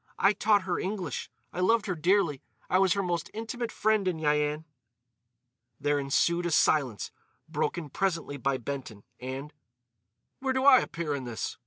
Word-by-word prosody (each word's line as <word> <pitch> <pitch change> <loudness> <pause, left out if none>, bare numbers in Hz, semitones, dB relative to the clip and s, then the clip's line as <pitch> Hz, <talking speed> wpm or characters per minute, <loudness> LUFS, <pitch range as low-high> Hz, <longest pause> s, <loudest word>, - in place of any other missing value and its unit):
"I 195 - +4
taught 205 -1 +3
her 180 -2 -1
English. 190 -1 -3 0.2
I - - -5
loved 220 +4 +3
her 190 - -1
dearly. 170 -3 +2 0.3
I 185 - +5
was 190 -2 +4
her 200 - -1
most 170 -2 -2
intimate 225 +1 -4
friend 215 -2 +1
in 180 -3 0
Yian." 150 0 +1 1.1
There 145 0 +1
ensued 170 +5 +1
a - - -1
silence, 140 - +2 0.4
broken 170 -3 -2
presently 165 -7 -1
by 135 +1 0
Benton; 125 -5 -6 0.2
and: 135 +4 -6 0.9
"Where 265 0 0
do 260 0 0
I 270 -3 +9
appear 165 -3 -3
in 135 -2 -4
this?" 115 -6 -4
170 Hz, 160 wpm, -29 LUFS, 145-200 Hz, 1.1 s, I